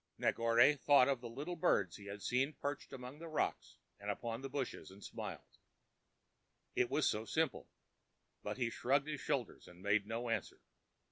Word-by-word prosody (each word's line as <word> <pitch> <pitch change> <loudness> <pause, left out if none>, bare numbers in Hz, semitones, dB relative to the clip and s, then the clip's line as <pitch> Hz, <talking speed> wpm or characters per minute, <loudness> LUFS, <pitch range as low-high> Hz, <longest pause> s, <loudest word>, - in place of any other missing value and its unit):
Negore 115 +5 +5
thought 140 -3 +6
of 135 -3 +1
the 120 - -6
little 150 +9 -4
birds 95 - +2
he 100 -1 -11
had 100 0 -6
seen 135 +4 +1
perched 145 +1 -4
among 130 +2 -8
the 165 - -7
rocks 155 - -1 0.2
and 100 +1 -5
upon 115 +3 -2
the 135 - -4
bushes, 135 -2 -3
and 95 +2 -13
smiled, - - -7 1.2
it - - +3
was - - +2
so 105 - +1
simple; 160 +3 0 0.7
but - - -4
he 120 -2 0
shrugged 140 +5 +2
his 150 -2 -3
shoulders 135 -7 -2
and 90 +1 -14
made 100 0 +2
no 115 +2 -2
answer. 115 - -2
125 Hz, 175 wpm, -37 LUFS, 110-140 Hz, 1.2 s, thought